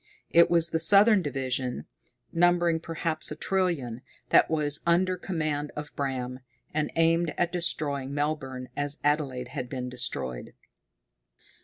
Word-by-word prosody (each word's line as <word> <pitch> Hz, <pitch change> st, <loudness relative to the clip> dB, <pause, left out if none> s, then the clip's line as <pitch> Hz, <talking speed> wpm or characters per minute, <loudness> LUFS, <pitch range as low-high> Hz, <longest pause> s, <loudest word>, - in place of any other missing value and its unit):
It 170 Hz, 0 st, +6 dB
was 170 Hz, -1 st, +3 dB
the 160 Hz, -, +1 dB
southern 205 Hz, +3 st, +6 dB
division, 130 Hz, -, -3 dB, 0.5 s
numbering 175 Hz, -1 st, +3 dB
perhaps 165 Hz, -1 st, -2 dB
a 150 Hz, -, -4 dB
trillion, 160 Hz, -10 st, -1 dB, 0.3 s
that -, -, +5 dB
was 150 Hz, -2 st, +1 dB
under 180 Hz, +2 st, +2 dB
command 155 Hz, -5 st, -3 dB
of 150 Hz, 0 st, -7 dB
Bram, 130 Hz, -2 st, -3 dB, 0.3 s
and 150 Hz, 0 st, 0 dB
aimed 165 Hz, 0 st, +2 dB
at 175 Hz, 0 st, +1 dB
destroying 145 Hz, -6 st, -1 dB
Melbourne 140 Hz, -3 st, -3 dB
as 145 Hz, +1 st, -2 dB
Adelaide 140 Hz, -4 st, 0 dB
had 125 Hz, -, -5 dB
been 125 Hz, -1 st, -4 dB
destroyed. 65 Hz, -, -3 dB
150 Hz, 130 wpm, -27 LUFS, 135-170 Hz, 0.5 s, It